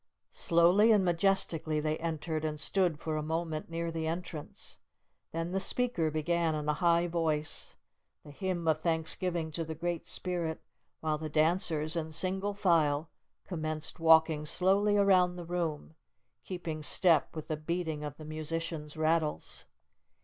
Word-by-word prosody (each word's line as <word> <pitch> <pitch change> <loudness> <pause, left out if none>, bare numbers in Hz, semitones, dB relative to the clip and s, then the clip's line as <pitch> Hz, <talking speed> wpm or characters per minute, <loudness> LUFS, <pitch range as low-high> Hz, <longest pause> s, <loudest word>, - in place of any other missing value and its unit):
Slowly 175 +7 +4
and 205 -3 +4
majestically 170 -3 +1
they 155 +1 -1
entered, 160 -1 -3
and 155 -1 -2
stood 175 0 +1
for 155 0 -3
a - - -1
moment 160 0 -3
near 165 0 -3
the 160 -1 -3
entrance. 165 -2 -6 0.5
Then 165 +1 -3
the 195 - 0
speaker 195 -5 0
began 160 +1 0
in 150 -1 -3
a 150 - +3
high 170 +1 +3
voice, 160 -3 -1 0.5
the 145 - -10
hymn 175 +1 -3
of 155 -1 +2
thanksgiving 165 0 -1
to 165 +2 -2
the 160 0 -6
Great 170 +1 -3
Spirit, 170 -3 -2 0.4
while 155 -1 -1
the 155 0 -4
dancers, 155 0 +2
in 160 -1 -3
single 190 +5 +1
file, 160 -5 +2 0.3
commenced 155 -2 -4
walking 160 -1 +5
slowly 195 +6 +2
around 185 -3 +4
the 175 -1 -7
room, 165 -3 -3 0.5
keeping 170 -4 -5
step 165 0 +3
with 155 - -6
the 155 - 0
beating 160 -1 -3
of 145 -1 -6
the 155 - -9
musicians' 155 0 -4
rattles. 155 -1 0
165 Hz, 150 wpm, -31 LUFS, 155-175 Hz, 0.5 s, walking